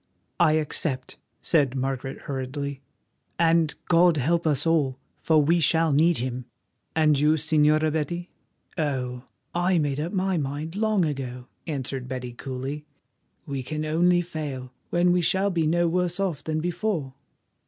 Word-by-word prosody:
"I 165 -3 +5
accept," 150 -3 -2 0.2
said 140 -6 +2
Margaret 135 0 -3
hurriedly, 140 +1 -4 0.6
"and 165 -2 +3
God 175 -1 +5
help 165 +5 +1
us 150 0 +1
all, 150 -6 +2 0.2
for 160 -1 +3
we 170 +4 +3
shall 160 0 +3
need 165 +4 +4
Him." 125 0 -3 0.5
"And 155 -3 +4
you, 150 +2 +4
Señora 155 0 +2
Betty?" 170 +3 -3 0.5
"Oh! 125 -4 -2 0.3
I 175 +1 +2
made 145 -3 0
up 165 +4 -2
my 190 -2 0
mind 150 +3 -3
long 215 -3 +2
ago," 130 -4 -5 0.2
answered 135 -4 -3
Betty 125 -2 -5
coolly. 135 +4 -5 0.6
"We 140 -2 -3
can 155 +4 -4
only 175 +3 +3
fail, 145 -7 -6 0.2
when 175 +1 +3
we 180 0 +3
shall 190 +4 +1
be 165 -3 +1
no 170 +2 +2
worse 180 +1 0
off 180 -7 -1
than 155 0 -1
before." 175 -5 -2
155 Hz, 145 wpm, -25 LUFS, 135-170 Hz, 0.6 s, I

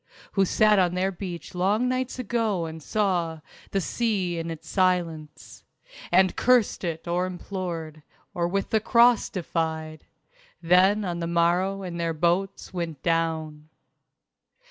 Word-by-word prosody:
Who 195 -1 +2
sat 210 +2 +4
on 180 -1 +2
their 190 +1 0
beach 180 -2 -7
long 200 +7 +1
nights 255 0 -2
ago 225 -7 -1
and 160 0 -7
saw 175 -4 -1 0.3
The 195 - 0
sea 190 -5 -1
in 165 0 -4
its 165 -1 -8
silence; 170 -5 -1 0.5
And 185 +1 +4
cursed 245 -6 +2
it 165 -1 -4
or 175 +2 0
implored; 175 -4 -5 0.3
Or 170 -1 0
with 195 +2 -2
the 220 - +3
Cross 235 +2 +4
defied; 160 -3 -3 0.5
Then 185 +5 +4
on 175 -2 -3
the 170 - -2
morrow 175 +3 +1
in 175 -2 -5
their 165 -1 -1
boats 175 +5 -1
went 165 -6 -4
down. 160 -2 -1
180 Hz, 140 wpm, -25 LUFS, 165-195 Hz, 0.5 s, sat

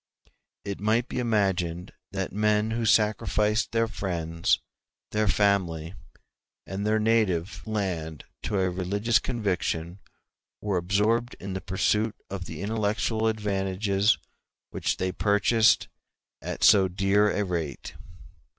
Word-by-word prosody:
It 100 -1 -4
might 110 +4 +1
be - - -4
imagined 95 -6 0 0.2
that 95 -3 -3
men 105 +1 +1
who 115 0 -1
sacrificed 105 0 +2
their 115 0 +1
friends, 85 -5 -1 0.5
their 105 0 +1
family, 90 -5 +1 0.7
and 100 +2 -3
their 110 0 +3
native 95 -6 +1
land 90 -8 -3 0.2
to 105 -3 -1
a 95 -1 +1
religious 100 +6 +1
conviction 95 -6 -2 0.6
were 100 -3 -1
absorbed 105 +7 +1
in 95 0 -6
the 95 - -4
pursuit 105 +3 0 0.2
of 95 -2 -4
the 85 +2 -7
intellectual 110 +1 0
advantages 100 -1 +1 0.5
which - - -1
they 95 0 -1
purchased 105 +4 +3 0.5
at - - -5
so 100 -3 +7
dear 95 +3 +2
a 105 - 0
rate. 80 -7 -4
100 Hz, 120 wpm, -26 LUFS, 90-110 Hz, 0.7 s, so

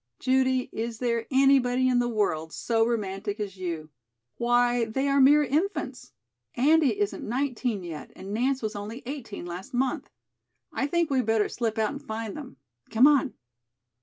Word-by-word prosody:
"Judy, 260 0 +1
is 230 0 -4
there 235 -1 -1
anybody 260 -2 +4
in 250 -1 +3
the 240 - +1
world 160 -8 -1
so 225 -1 +1
romantic 205 -2 -3
as 200 -2 -5
you? 165 -4 -4 0.5
Why, 240 0 +2
they 265 +5 -1
are 275 0 +3
mere 295 +3 +6
infants. 285 -2 -2 0.4
Andy 310 +7 +3
isn't 410 -1 -1
nineteen 245 -4 -2
yet 165 -4 -8
and 195 +2 -7
Nance 255 +3 0
was 215 -1 -3
only 210 +5 -6
eighteen 240 -9 -6
last 175 +6 -7
month. 260 +1 -1 0.6
I 275 - -1
think 335 0 0
we'd 255 -4 +1
better 220 -2 +2
slip 225 -2 -2
out 220 -1 +1
and 280 - -7
find 220 -5 -5
them. 285 - -9 0.3
Come 230 +4 +5
on." 285 -2 +4
245 Hz, 165 wpm, -27 LUFS, 215-270 Hz, 0.6 s, mere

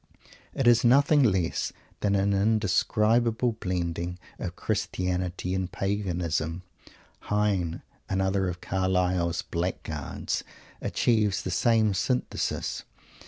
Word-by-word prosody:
It 135 - 0
is 120 -1 +6
nothing 140 +4 +5
less 95 -9 +1 0.3
than 100 -1 +1
an 100 +1 +2
indescribable 110 +3 +2
blending 85 -1 -2 0.2
of 90 0 -4
Christianity 90 -3 -2
and 95 -1 -2
Paganism. 90 -4 -2 0.6
Heine, 100 -5 0 0.3
another 95 0 +1
of 90 0 -6
Carlyle's 90 -2 0
"blackguards," 85 -4 -3 0.4
achieves 105 -4 +1
the 95 - -3
same 110 +1 +3
synthesis. 125 +7 -1
95 Hz, 95 wpm, -27 LUFS, 90-105 Hz, 0.6 s, is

